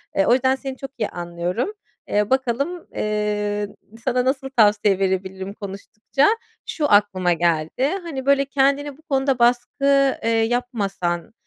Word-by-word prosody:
Eee, 195 - +3
o 240 - +5
yüzden 260 +1 +3
seni 265 -1 -6
çok 270 -1 -7
iyi 215 - -1
anlıyorum. 175 - -3 0.4
Eee, 210 0 +1
bakalım, 265 +7 -1
eee, 210 -1 -1 0.4
sana 250 0 +1
nasıl 270 0 -1
tavsiye 210 -5 +3
verebilirim 190 0 -2
konuştukça, 210 +7 -1 0.4
şu, 295 -6 -1
aklıma 190 -4 +3
geldi: 165 +6 0 0.2
Hani, 275 -6 -6
böyle, 280 0 +4
kendine 275 +1 +1
bu - - -21
konuda 270 -4 0
baskı, 270 +3 +3
eee, 230 - +1
yapmasan, 225 -7 -1
235 Hz, 135 wpm, -22 LUFS, 200-270 Hz, 0.4 s, o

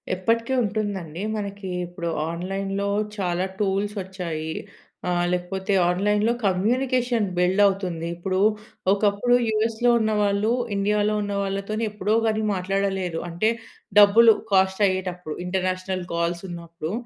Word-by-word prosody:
ఎప్పటికి 230 +6 0
ఉంటుందండి. 195 -6 -3 0.2
మనకి 200 -1 -5 0.2
ఇప్పుడు 175 -1 -5 0.2
ఆన్‌లైన్‌లో 195 +3 -3 0.3
చాలా 180 -1 0
టూల్స్ 205 +1 0
వచ్చాయి. 175 -4 -5 0.6
ఆహ్, 175 0 +1
లేకపోతే 190 +2 -2 0.2
ఆన్‌లైన్‌లో 210 +5 +2
కమ్యూనికేషన్ 240 +4 +1
బిల్డ్ 180 +3 +3
అవుతుంది. 180 -4 -2
ఇప్పుడు, 185 +2 -2 0.5
ఒకప్పుడు 205 +4 +2
యూఎస్‌లో 220 +2 +1
ఉన్న 220 -1 +1
వాళ్ళు, 205 +2 +1 0.2
ఇండియా‌లో 210 +1 +1
ఉన్న 205 0 -3
వాళ్ళతోని 200 +3 -3
ఎప్పుడో 210 0 -1
గాని 220 -1 +1
మాట్లాడలేరు. 190 -2 -1
అంటే 175 +6 +1 0.5
డబ్బులు 220 +3 +8 0.2
కాస్ట్ 190 +1 +3
అయ్యేటప్పుడు 180 -4 -3
ఇంటర్నేషనల్ 185 0 -2
కాల్స్ 170 +1 -1
ఉన్నప్పుడు 170 -2 -6
195 Hz, 115 wpm, -24 LUFS, 180-210 Hz, 0.6 s, డబ్బులు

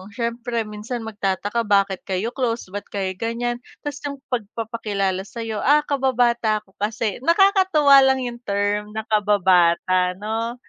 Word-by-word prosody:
syempre 235 0 -2
minsan 215 +3 -6
magtataka, 205 +1 -2
bakit 200 -2 +2
kayo 195 +5 -2
close, 235 -7 -2
ba't 205 0 -6
kayo 195 -2 -3
ganyan. 240 +1 -2 0.2
Tas 290 -1 -5
yung 280 -1 -8
pagpapakilala 210 -4 -2
sa'yo, 225 -2 -5
"Ah, 295 +2 +4
kababata 240 -6 +1
ko 190 - -27
kasi." 215 0 -2
Nakakatuwa 335 - +5
lang 265 -1 +3
yung 240 -1 -5
term 205 -1 -2
na 220 - -2
kababata, 185 -3 +3
'no, 225 +4 -3
225 Hz, 135 wpm, -22 LUFS, 205-245 Hz, 0.2 s, Nakakatuwa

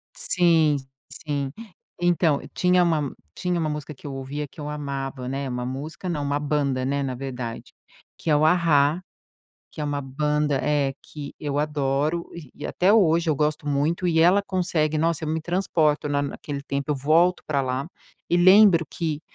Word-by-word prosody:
Sim, 165 -4 +3 0.4
sim. 140 -3 -3 0.5
Então, 170 -4 +2
tinha 180 0 +3
uma 155 -5 0 0.2
tinha 180 -1 -1
uma 160 -2 0
música 150 0 -5
que 135 - -12
eu 140 - -5
ouvia 140 +2 -5
que 150 - -14
eu 145 - -5
amava, 140 -3 -4
né, 135 +1 -3
uma 125 -1 -3
música, 150 +8 -5
não, 150 -3 -2
uma 145 0 0
banda, 145 -3 0
né, 140 +1 0
na 130 -2 -2
verdade, 125 -3 -6 0.5
que - - -6
é 150 - +5
o 150 - +3
A-Ha. 160 -1 +3 0.7
Que - - -10
é 150 - -1
uma 145 -1 -2
banda, 150 +1 0
eh, 145 -2 +1
que 145 -2 -9
eu 145 -2 -2
adoro 150 +2 -1 0.2
e - - -8
até 185 +3 +2
hoje 170 -6 +4
eu 150 - +2
gosto 150 0 0
muito. 145 +5 0
E 165 -2 +2
ela 180 +5 +5
consegue 170 -6 0
nossa, 165 0 0
eu 155 - -2
me 160 +1 0
transporto 160 -4 0
na 145 0 +1
na 140 - -3
naquele 140 -2 -6
tempo, 140 +1 -3
eu - - +1
volto 160 +6 +3
pra 140 -2 +1
lá. 130 +2 -2 0.4
E - - +3
lembro 185 -1 +6
que, 155 -3 -3
150 Hz, 185 wpm, -24 LUFS, 140-165 Hz, 0.7 s, lembro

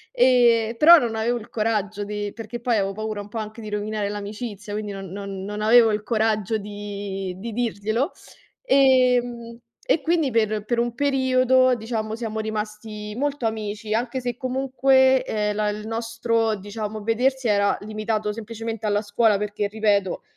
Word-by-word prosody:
Ehm, 240 - +4
però 335 +6 +9
non 230 -4 -2
avevo 235 +2 0
il 215 - -13
coraggio 210 -2 -1
di 205 0 -4
perché 225 +1 -7
poi 240 -1 +1
avevo 195 -1 0
paura 215 0 -4
un 205 - -11
po' 225 - -5
anche 215 +1 -7
di 215 - -7
rovinare 210 0 -2
l'amicizia, 205 0 -6
quindi 210 -1 -4
non 195 -1 -7
non 195 -1 -6
non 210 +1 -5
avevo 225 +1 +6
il 210 0 -2
coraggio 220 -1 0
di 200 -2 -5
di 230 +4 -6
dirglielo. 230 - -1 0.5
Ehm 250 - +3 0.3
e 335 - +2
quindi 320 -3 +1
per 215 -2 +1
per 235 +2 -1
un 240 0 -1
periodo, 260 -2 +3
diciamo, 220 -1 -3
siamo 225 -2 -4
rimasti 215 0 -5
molto 285 -3 -1
amici, 215 -1 -4
anche 240 +3 -1
se 245 -1 -3
comunque, 265 0 +3
ehm, 210 -1 -1
la 210 0 0
il 210 +1 -5
nostro, 230 0 0
diciamo, 210 +1 -6
vedersi 250 +3 +1
era 200 -1 +2
limitato 215 0 -2
semplicemente 225 0 -6
alla 205 0 +1
scuola 210 0 +2
perché, 210 0 -2
ripeto, 205 -3 0
220 Hz, 160 wpm, -23 LUFS, 210-240 Hz, 0.5 s, però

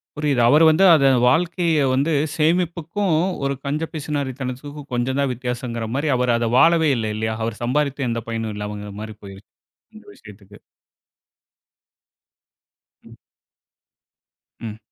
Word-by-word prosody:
புரியுது. 145 -4 0
அவரு 150 +5 +5
வந்து 160 +4 +3
அத 140 -3 +4 0.2
வாழ்க்கைய 165 +1 +1
வந்து 140 +5 +1 0.2
சேமிப்புக்கும், 170 +3 0 0.3
ஒரு 140 - 0
கஞ்ச 150 +3 -2
பிசுனாரித்தனத்துக்கும் 140 -1 -5
கொஞ்சந்தான் 130 +2 0
வித்தியாசங்கிற 120 -2 -4
மாரி, 145 +3 -1
அவரு 125 -1 +1
அத 115 - -1
வாழவே 165 +1 +4
இல்ல 110 -1 -2
இல்லையா? 110 0 -2
அவரு 115 -1 -4
சம்பாரித்து 140 +1 -1
எந்த 115 0 -2
பயனும் 115 -1 -3
இல்லாமங்கிற 105 0 -6
மாரி 110 0 -8
போயி 95 -1 -10 0.6
இந்த 215 - -14
விஷயத்துக்கு. 105 -1 -15 2.5
ம் - - -15 1.4
ம். 110 -2 -7
130 Hz, 115 wpm, -21 LUFS, 115-155 Hz, 2.5 s, அவரு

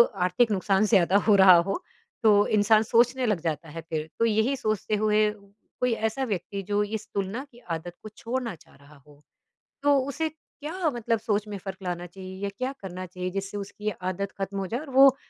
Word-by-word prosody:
आर्थिक 185 +5 +2
नुकसान 195 +1 +2
ज़्यादा 190 -2 +5
हो 210 - +7
रहा 185 -1 +9
हो, 195 - -2 0.4
तो 205 -1 +5
इंसान 215 +1 +4
सोचने 245 +3 +3
लग 210 -6 +1
जाता 160 -1 -3
है 165 +2 -7
फिर, 155 -1 -3
तो 230 - +4
यही 220 +4 +2
सोचते 215 -4 -1
हुए 215 0 +4 0.5
कोई 250 - +3 0.2
ऐसा 265 +4 -3
व्यक्ति 200 -2 -3
जो 205 0 +1
इस 215 - -6
तुलना 200 +6 -2
की 240 - -17 0.2
आदत 170 +2 -7
को 215 - -7
छोड़ना 240 -1 -3
चाह 155 - -22
रहा 140 +2 -18
हो, 145 0 -19 0.6
तो 285 -1 +5
उसे 315 +3 -2
क्या 315 +2 -4
मतलब 230 -1 0
सोच 210 -1 -1
में 205 -1 -5
फ़र्क 190 0 -7
लाना 175 -1 -3
चाहिए 185 +1 -9
या 200 - 0
क्या 260 +2 -2
करना 185 -1 -6
चाहिए 180 +1 -5
जिससे 195 +1 -4
उसकी 205 +1 -4 0.2
आदत 195 +2 -3
ख़त्म 195 +1 -3
हो 190 - -3
जाए 235 +6 -2
और 300 0 -9
वो 270 -1 +8
205 Hz, 200 wpm, -26 LUFS, 185-230 Hz, 0.6 s, रहा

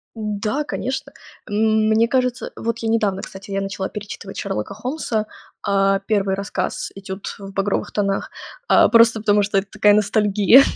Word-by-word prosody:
Да, 215 +5 -2
конечно. 280 0 -4 0.4
М, 215 +1 +2
мне 220 +1 +3
кажется, 250 -1 0
вот 230 0 -2
я 225 - -2
недавно, 210 -4 +1
кстати, 195 +2 -10
я 195 0 -1
начала 195 -1 -3
перечитывать 205 -1 -8
Шерлока 105 - -3
Холмса. 230 -2 -2 0.4
А, 195 -1 +2
первый 200 -3 +1
рассказ 200 0 -3
"Этюд 195 0 -7
в 195 -1 -9
багровых 195 +1 -1
тонах". 200 -1 -1 0.4
А, - - +6
просто 230 -1 +5
потому 205 -1 +3
что 200 0 +1
это 195 - -1
такая 210 - +4
ностальгия. 210 +3 +5
210 Hz, 155 wpm, -21 LUFS, 195-225 Hz, 0.4 s, А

